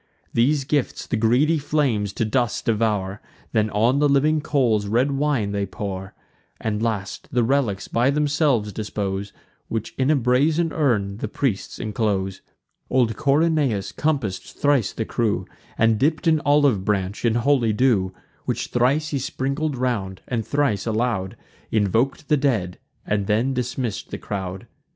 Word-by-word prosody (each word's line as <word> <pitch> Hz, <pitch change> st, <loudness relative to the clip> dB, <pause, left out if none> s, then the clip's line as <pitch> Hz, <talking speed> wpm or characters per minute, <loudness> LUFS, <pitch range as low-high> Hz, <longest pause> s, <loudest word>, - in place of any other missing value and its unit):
These 135 Hz, +5 st, +3 dB
gifts 145 Hz, 0 st, -1 dB
the -, -, -2 dB
greedy 125 Hz, +9 st, +3 dB
flames 135 Hz, -9 st, 0 dB
to 115 Hz, -, -1 dB
dust 120 Hz, +1 st, 0 dB
devour; 105 Hz, -3 st, 0 dB, 0.3 s
Then 110 Hz, -2 st, +2 dB
on 115 Hz, +7 st, +2 dB
the 145 Hz, 0 st, +3 dB
living 150 Hz, +3 st, +3 dB
coals 120 Hz, -9 st, +1 dB
red 120 Hz, +7 st, +2 dB
wine 135 Hz, -7 st, 0 dB
they 100 Hz, -1 st, -1 dB
pour; 95 Hz, -1 st, -6 dB, 0.4 s
And, 110 Hz, -1 st, -2 dB
last, 110 Hz, -4 st, -3 dB
the 125 Hz, -3 st, +2 dB
relics 115 Hz, -6 st, 0 dB
by 120 Hz, +3 st, +2 dB
themselves 145 Hz, -7 st, +1 dB
dispose, 100 Hz, -1 st, -3 dB, 0.4 s
Which 115 Hz, -1 st, -4 dB
in 130 Hz, +1 st, +2 dB
a 155 Hz, -, +5 dB
brazen 145 Hz, +6 st, +2 dB
urn 105 Hz, -10 st, +1 dB
the 110 Hz, -, -3 dB
priests 115 Hz, -3 st, -2 dB
inclose. 100 Hz, -3 st, -1 dB, 0.5 s
Old 120 Hz, -4 st, +2 dB
Corynaeus 140 Hz, -, +1 dB
compass'd 135 Hz, -12 st, -2 dB
thrice 145 Hz, -7 st, +2 dB
the 110 Hz, -, -3 dB
crew, 110 Hz, -2 st, -1 dB, 0.3 s
And 110 Hz, -1 st, +3 dB
dipp'd 155 Hz, +6 st, +1 dB
an 160 Hz, -2 st, +4 dB
olive 145 Hz, -8 st, +3 dB
branch 100 Hz, -1 st, -1 dB
in 115 Hz, -1 st, +2 dB
holy 120 Hz, -2 st, +3 dB
dew; 105 Hz, -5 st, +2 dB, 0.3 s
Which -, -, -2 dB
thrice 135 Hz, +6 st, +2 dB
he 140 Hz, -, -1 dB
sprinkled 140 Hz, +3 st, -2 dB
round, 110 Hz, -7 st, -2 dB
and 115 Hz, -3 st, -1 dB
thrice 130 Hz, -9 st, 0 dB
aloud 110 Hz, -4 st, -1 dB, 0.3 s
Invok'd 115 Hz, -, +1 dB
the 150 Hz, -, +3 dB
dead, 110 Hz, -11 st, 0 dB, 0.3 s
and 100 Hz, -1 st, -1 dB
then 115 Hz, +6 st, +1 dB
dismissed 125 Hz, -4 st, -3 dB
the -, -, -5 dB
crowd. 95 Hz, -2 st, -5 dB
120 Hz, 150 wpm, -23 LUFS, 105-140 Hz, 0.5 s, a